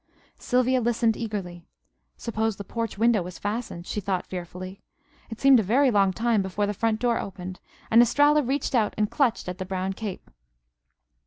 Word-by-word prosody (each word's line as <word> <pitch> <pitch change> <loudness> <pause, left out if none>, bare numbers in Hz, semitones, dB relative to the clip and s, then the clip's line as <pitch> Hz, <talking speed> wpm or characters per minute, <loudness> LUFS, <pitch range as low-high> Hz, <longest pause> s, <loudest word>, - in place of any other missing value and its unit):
Sylvia 255 0 +2
listened 230 -1 +1
eagerly. 195 -6 -5 0.5
Suppose 220 -2 -2
the 200 - -7
porch 230 +1 -4
window 225 -1 +3
was 180 +1 -7
fastened? 205 -4 -4
she 210 - -3
thought 190 -2 -2
fearfully. 185 +1 -7 0.5
It 225 -1 -8
seemed 275 -2 +6
a - - +3
very 250 +7 +3
long 200 -3 +3
time 225 +1 +1
before 190 +2 -1
the 205 - -2
front 220 +2 0
door 240 -1 +1
opened, 185 -1 -7 0.3
and 230 +1 +8
Estralla 290 +5 +4
reached 275 +2 -2
out 225 -4 +1
and 210 -1 0
clutched 250 -9 +1
at 180 +1 -5
the - - -2
brown 190 0 -2
cape. 195 - -7
215 Hz, 175 wpm, -25 LUFS, 190-235 Hz, 0.5 s, and